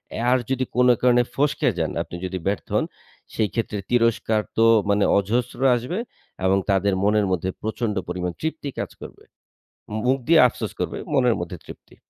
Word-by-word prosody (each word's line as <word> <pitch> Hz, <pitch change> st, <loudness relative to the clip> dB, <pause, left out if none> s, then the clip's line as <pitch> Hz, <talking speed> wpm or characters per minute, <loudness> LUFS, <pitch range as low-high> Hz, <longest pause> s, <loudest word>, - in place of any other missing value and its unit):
এ -, -, -4 dB
আর 130 Hz, -, +5 dB
যদি 130 Hz, -1 st, 0 dB
কোন 125 Hz, 0 st, +4 dB
কারণে 125 Hz, -1 st, +4 dB
ফসকে 145 Hz, -2 st, +1 dB
যান, 80 Hz, -2 st, -1 dB
আপনি 85 Hz, -, -7 dB
যদি 95 Hz, 0 st, -3 dB
ব্যর্থ 100 Hz, -, -2 dB
হন, -, -, +2 dB, 0.5 s
সেইক্ষেত্রে 110 Hz, 0 st, -1 dB
তিরস্কার 115 Hz, -2 st, +2 dB, 0.2 s
তো 115 Hz, -, +5 dB, 0.2 s
মানে 100 Hz, 0 st, +3 dB
অজস্র 120 Hz, +6 st, -1 dB, 0.2 s
আসবে 125 Hz, -, -3 dB, 0.5 s
এবং 95 Hz, +1 st, +4 dB
তাদের 100 Hz, 0 st, +2 dB
মনের 105 Hz, 0 st, +3 dB
মধ্যে 95 Hz, +1 st, -1 dB
প্রচন্ড 110 Hz, 0 st, -2 dB
পরিমাণ 90 Hz, 0 st, -3 dB
তৃপ্তি 160 Hz, -2 st, -3 dB
কাজ -, -, -4 dB
করবে। -, -, -11 dB, 0.7 s
মু 110 Hz, -, -2 dB
মুখ 135 Hz, +1 st, +3 dB
দিয়ে 165 Hz, -1 st, +6 dB
আফসোস -, -, -5 dB
করবে -, -, -2 dB, 0.2 s
মনের 125 Hz, -3 st, +3 dB
মধ্যে 90 Hz, 0 st, -5 dB
তৃপ্তি। -, -, -13 dB
110 Hz, 170 wpm, -23 LUFS, 100-125 Hz, 0.7 s, দিয়ে